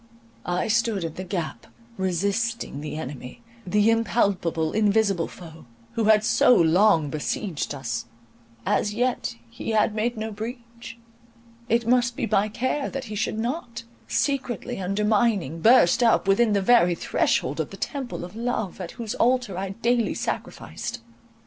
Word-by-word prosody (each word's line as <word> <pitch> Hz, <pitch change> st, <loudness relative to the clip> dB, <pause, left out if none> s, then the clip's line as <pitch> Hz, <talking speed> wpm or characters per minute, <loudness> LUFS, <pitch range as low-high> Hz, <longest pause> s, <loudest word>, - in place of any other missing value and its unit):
I 180 Hz, 0 st, 0 dB
stood 225 Hz, -4 st, +1 dB
in 165 Hz, -2 st, -4 dB
the 185 Hz, -, -6 dB
gap, 170 Hz, -, -4 dB, 0.3 s
resisting 200 Hz, 0 st, -1 dB
the 150 Hz, 0 st, -5 dB
enemy—the 135 Hz, -, -2 dB
impalpable, 195 Hz, -8 st, +1 dB
invisible 205 Hz, -4 st, +2 dB
foe, 160 Hz, -6 st, -12 dB, 0.2 s
who 225 Hz, -, -1 dB
had 215 Hz, 0 st, +5 dB
so 245 Hz, +2 st, +5 dB
long 165 Hz, -3 st, +4 dB
besieged 155 Hz, 0 st, -3 dB
us—as 115 Hz, -, -4 dB
yet 245 Hz, -, -1 dB
he 115 Hz, -, -7 dB
had 215 Hz, -1 st, +2 dB
made 225 Hz, +2 st, -1 dB
no 220 Hz, +1 st, -3 dB
breach: 235 Hz, +2 st, -8 dB, 0.7 s
it 230 Hz, +1 st, +2 dB
must 245 Hz, -1 st, +3 dB
be -, -, -1 dB
my 210 Hz, 0 st, +1 dB
care 260 Hz, +6 st, -1 dB
that 270 Hz, -1 st, -5 dB
he -, -, -4 dB
should 215 Hz, +1 st, -1 dB
not, 235 Hz, +1 st, -4 dB, 0.2 s
secretly 255 Hz, -4 st, -1 dB
undermining, 200 Hz, -, +1 dB
burst 230 Hz, -2 st, +5 dB
up 230 Hz, -4 st, +3 dB
within 210 Hz, +3 st, +4 dB
the 200 Hz, -1 st, +1 dB
very 190 Hz, -6 st, +5 dB
threshold -, -, 0 dB
of -, -, -1 dB
the -, -, -10 dB
temple 265 Hz, -, -4 dB
of 180 Hz, -, -12 dB
love, 225 Hz, -5 st, -3 dB
at 180 Hz, -, -6 dB
whose 230 Hz, -3 st, -5 dB
altar 245 Hz, -5 st, +1 dB
I 190 Hz, +1 st, -3 dB
daily 235 Hz, +3 st, 0 dB
sacrificed. 240 Hz, 0 st, -5 dB
210 Hz, 145 wpm, -25 LUFS, 175-235 Hz, 0.7 s, had